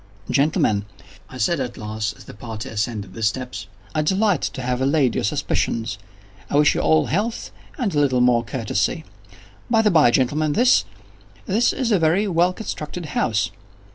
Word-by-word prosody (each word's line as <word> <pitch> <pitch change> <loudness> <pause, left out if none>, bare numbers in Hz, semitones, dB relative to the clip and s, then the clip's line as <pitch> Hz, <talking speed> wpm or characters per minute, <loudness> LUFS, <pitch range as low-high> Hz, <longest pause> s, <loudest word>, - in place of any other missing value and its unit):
"Gentlemen," 125 -7 +2 0.4
I 130 - -9
said 140 +8 +1
at 125 -2 -4
last, 110 -1 -4
as - - -13
the - - -12
party 110 -1 -7
ascended 105 -3 -3
the 115 - -8
steps, 110 -4 -2 0.3
"I 155 - +1
delight 190 +2 +2
to 135 -3 -4
have 125 0 -1
allayed 135 -3 +2
your - - -1
suspicions. 110 +1 -1 0.5
I - - -2
wish 145 0 +5
you - - -1
all 80 0 +3
health, 220 +7 -2 0.3
and 235 -9 -1
a 145 - +2
little 130 -3 +2
more 125 -1 +4
courtesy. 115 - -2 0.6
By 225 -2 +3
the 210 - +4
bye, 155 -7 +6
gentlemen, 145 +5 +1
this—this 240 -2 0
is 245 -3 -1
a 200 - +4
very 170 +6 +2
well 175 -1 +2
constructed 180 -4 -6
house." 105 -4 0
135 Hz, 170 wpm, -22 LUFS, 110-175 Hz, 0.6 s, bye